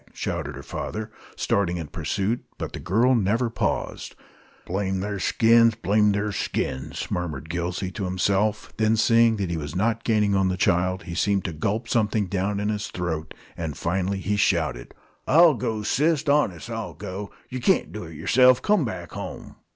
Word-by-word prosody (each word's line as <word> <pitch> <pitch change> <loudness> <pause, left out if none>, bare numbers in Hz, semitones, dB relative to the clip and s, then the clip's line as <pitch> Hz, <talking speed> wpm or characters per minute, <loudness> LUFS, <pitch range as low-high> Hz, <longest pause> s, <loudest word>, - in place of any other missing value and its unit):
shouted 70 +1 -3
her 70 - -8
father, 110 +8 -5 0.2
starting 90 -3 0
in 85 - -4
pursuit. 95 +9 -2
But - - -5
the - - -5
girl 115 +9 +2
never 115 +2 +1
paused. - - -2 0.5
"Blame 95 +1 -1
the'r 100 +1 -3
skins! 115 +3 +4
Blame 105 0 +2
the'r 105 +1 -1
skins!" 65 -8 -3
murmured 80 -4 -3
Gillsey 90 +2 -2
to 100 0 -4
himself. 100 +3 0
Then, 110 0 +2
seeing 115 +1 +4
that 95 -4 -2
he 85 - -1
was 75 +1 -5
not 115 +4 0
gaining 105 -3 +2
on 95 -1 +3
the 90 0 -1
child, 90 0 +1
he 85 - -7
seemed 100 +2 +1
to 85 - -3
gulp 105 +9 -2
something 110 -2 +1
down 100 +2 -1
in 105 +1 -1
his 105 -1 -2
throat, 80 -3 -4 0.2
and 80 -4 -4
finally 95 +3 -1
he 105 +2 0
shouted: - - 0 0.3
"I'll 165 +3 +7
go, 110 -3 -2
sis, 150 +6 +1
honest 120 - +1
I'll 110 -8 -5
go. 100 +3 -6 0.2
Yer 130 - -4
kaint 120 - +2
do - - -6
it - - -10
yerself. 130 +1 +5
Come 210 -1 +2
back 90 -8 -5
home!" - - -7
100 Hz, 175 wpm, -25 LUFS, 90-115 Hz, 0.5 s, I'll